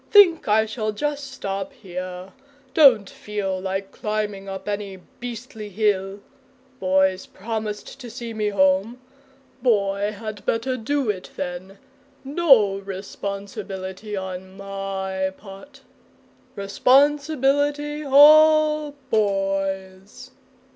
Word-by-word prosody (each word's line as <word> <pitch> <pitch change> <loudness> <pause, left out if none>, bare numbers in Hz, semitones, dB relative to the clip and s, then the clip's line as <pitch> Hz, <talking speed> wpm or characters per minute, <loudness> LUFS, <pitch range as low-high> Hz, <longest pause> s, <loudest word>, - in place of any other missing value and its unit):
Think 370 -6 +6
I 215 +1 +4
shall 215 0 -3
just 285 +3 -3
stop 195 +7 -4
here. 185 -4 -7 0.4
Don't 255 -10 +6
feel 195 -2 -4
like 195 +1 -4
climbing 210 -2 -3
up 190 0 -7
any 205 -2 -4 0.2
beastly 230 -3 -7
hill. 200 -1 0 0.6
Boy's 190 0 +2
promised 215 +3 -5
to 245 -3 -8
see 235 0 -7
me 215 -1 -1
home. 195 +4 +2 0.6
Boy 205 -4 +1
had 215 -1 -7
better 240 +5 -1
do 255 0 0
it 185 -2 -9
then! 185 +1 -6 0.5
No 270 - +4
responsibility 195 0 -6
on 190 0 -6
my 195 -1 -3
part. 215 +8 -13 0.7
Responsibility 285 +6 +2
all 305 +1 +6 0.2
Boy's!" 195 -2 -2
210 Hz, 100 wpm, -23 LUFS, 195-255 Hz, 0.7 s, Think